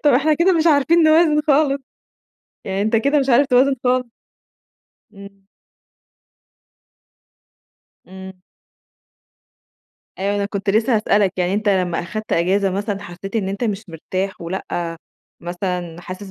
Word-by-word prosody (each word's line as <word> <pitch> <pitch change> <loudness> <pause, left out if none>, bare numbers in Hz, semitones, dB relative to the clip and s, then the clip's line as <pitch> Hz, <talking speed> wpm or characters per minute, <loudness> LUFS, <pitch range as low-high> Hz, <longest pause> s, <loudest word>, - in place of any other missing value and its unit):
طب 295 - +6
إحنا 300 +5 +3
كده 345 +4 +3
مش 330 -1 +1
عارفين 320 +2 +4
نوازن 310 -1 +4
خالص، 280 -1 +2 0.8
يعني 195 +1 -2
أنت 220 +2 +1
كده 280 +6 +2
مش 270 -1 -1
عارف 265 +3 +4
توازن 265 +1 +3
خالص. 250 -1 +1 1.1
إمم. 200 0 -13 2.7
إمم. 190 0 -11 1.8
أيوه، 200 +1 -1
أنا 200 0 -1
كنت 200 -1 -3
لسه 220 +3 +2
هاسألك 205 -3 +2
يعني 180 +1 0
أنت 210 0 -1
لما 180 -3 +1
أخدت 215 +5 -6
إجازة 190 +3 +1
مثلًا 205 +1 -3
حسيت 195 +5 -7
إن 195 -3 -1
أنت 200 +5 -3
مش 205 -2 -3
مرتاح، 185 +4 -4
ولأ 170 -1 -4 0.4
مثلًا 175 -1 -4
حاسس 185 +2 -9
205 Hz, 130 wpm, -20 LUFS, 190-265 Hz, 2.7 s, طب